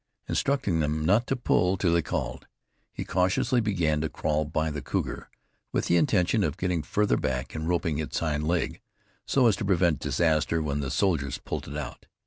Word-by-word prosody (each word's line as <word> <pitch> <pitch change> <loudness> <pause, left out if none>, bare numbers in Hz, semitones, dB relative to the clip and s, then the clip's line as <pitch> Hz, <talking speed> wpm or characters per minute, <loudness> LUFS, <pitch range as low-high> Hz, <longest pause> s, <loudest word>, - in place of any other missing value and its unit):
Instructing 120 -12 0
them 75 0 0
not 105 +8 +3
to 135 - +1
pull 95 -6 +2
till 85 -2 +2
he 85 - +3
called, - - -4 0.4
he - - -5
cautiously 95 +7 +2
began 85 -8 +1
to 80 - -1
crawl 75 0 -1
by 80 +1 -1
the 75 -1 -4
cougar, - - -3 0.4
with - - 0
the 85 - +2
intention 90 +3 +3
of 75 -1 -1
getting 90 -3 0
farther 105 +6 +1
back 65 -5 -2
and 80 +1 -4
roping 85 -3 0
its 80 - -3
hind 75 -2 -1
leg, 85 0 -1 0.5
so 135 -2 +3
as 110 -4 +5
to - - -3
prevent 90 -5 +2
disaster 80 -1 +1
when 75 -2 -1
the 70 -2 -2
soldiers 70 -3 0
pulled - - -5
it 70 +2 -5
out. 75 - -7
80 Hz, 190 wpm, -27 LUFS, 75-95 Hz, 0.5 s, as